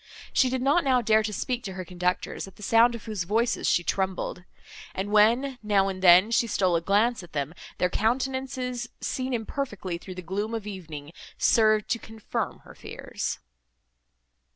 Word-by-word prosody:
She 260 - +4
did 255 0 -1
not 290 +6 +3
now 255 -3 +3
dare 220 0 +4
to 215 0 -3
speak 245 +4 -2
to 195 - -5
her 185 -1 -6
conductors, 180 +2 -2
at 195 - -14
the 210 - -12
sound 230 +3 +5
of 230 - -9
whose 215 -5 -3
voices 225 +6 +1
she 175 - +3
trembled; 190 -1 -2 0.5
and 195 +2 -3
when, 240 +5 +3
now 200 -2 +2
and 185 -1 -5
then, 185 +4 +7
she 235 0 +3
stole 185 -5 +2
a 165 - +1
glance 210 +6 +2
at 175 - -14
them, 145 +1 -2 0.2
their 180 0 +1
countenances, 250 +1 -1
seen 260 0 -3
imperfectly 220 -7 -3
through 185 +1 -9
the 185 - -7
gloom 205 +6 -3
of 220 -2 -5
evening, 160 -7 -7 0.3
served 215 -2 +4
to 230 - 0
confirm 220 -1 -5
her - - -12
fears. - - -5
210 Hz, 175 wpm, -26 LUFS, 185-240 Hz, 0.5 s, then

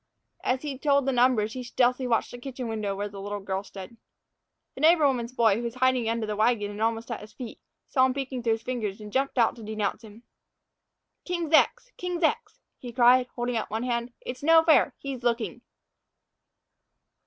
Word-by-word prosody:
As 255 +2 0
he 280 -3 -5
told 280 -2 +2
the 270 - +1
numbers 240 -4 +2
he 255 - -5
stealthily 250 +1 +1
watched 230 -2 +1
the 245 - -9
kitchen 255 -1 -6
window 215 -3 -2
where 205 +1 -3
the 200 -1 -9
little 205 +1 -4
girl 195 -1 -3
stood. 200 +3 -10 0.8
The - - -9
neighbor 320 -1 +5
woman's 245 -4 0
boy, 225 -5 +3
who - - -3
was 235 0 -4
in - - -12
hiding 255 -3 +2
under 230 -1 -1
the 210 -1 -3
wagon 215 -1 +1
and 205 +1 -7
almost 225 +1 -1
at 230 - -3
his 210 0 -13
feet, 245 -4 -8 0.3
saw 260 -2 +3
him 260 - -3
peeking 265 -2 -4
through 230 -1 +2
his 225 0 -4
fingers 225 -6 -3
and 210 -1 -10
jumped 270 0 0
out 230 -2 +3
to - - -10
denounce 215 +1 -3
him. 220 +2 -14 1.0
"King's 345 -3 -3
ex, - - +3
king's 360 -1 -3
ex!" 395 +10 0 0.2
he 245 - -8
cried, 250 +1 +5
holding 240 -1 -1
up 220 - -3
one 220 +3 -2
hand. 240 -1 -2
"It's 250 - -7
no 325 +2 +6
fair; 315 -4 +4
he's 270 -3 -6
looking." 235 0 -1
240 Hz, 205 wpm, -27 LUFS, 220-260 Hz, 1.0 s, no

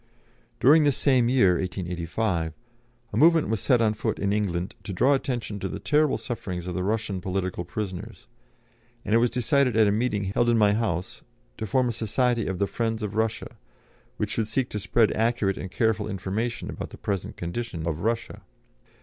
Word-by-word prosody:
During 150 +4 +6
this 145 -3 +2
same 130 -4 +3
year 95 -9 +4
(1885) 90 -1 -2 0.6
a - - -1
movement 165 -2 +5
was 110 -1 0
set 125 +3 +3
on 110 -2 +3
foot 105 - -2
in 100 0 0
England 95 -4 -1
to - - -5
draw 130 +10 +4
attention 120 -6 -2
to 95 - -3
the - - -5
terrible 150 -1 +2
sufferings 90 -8 -5
of 90 - -4
the 90 - -2
Russian 100 -2 -1
political 95 -1 -2
prisoners, 100 +4 -6 0.8
and 105 - -1
it 115 - +6
was 120 +1 +3
decided 125 0 +2
at 110 - +6
a 100 - +3
meeting 105 -1 0
held 100 +5 +1
in 120 - +4
my 105 -2 +4
house 100 -5 -2 0.4
to 110 - -3
form 130 +5 +2
a - - 0
society 115 +1 0
of 95 0 -2
the 100 - +1
friends 115 +1 -2
of 105 -1 -3
Russia, 110 0 -2 0.6
which - - -2
should 110 -2 -1
seek 125 +3 -1
to 105 - -3
spread 110 +2 +2
accurate 110 -3 0
and 95 - -5
careful 110 +1 0
information 105 +4 -3
about - - -6
the - - -11
present 100 -3 -3
condition 85 -1 -4
of 80 -2 -2
Russia. 115 +4 -2
110 Hz, 190 wpm, -26 LUFS, 95-120 Hz, 0.8 s, During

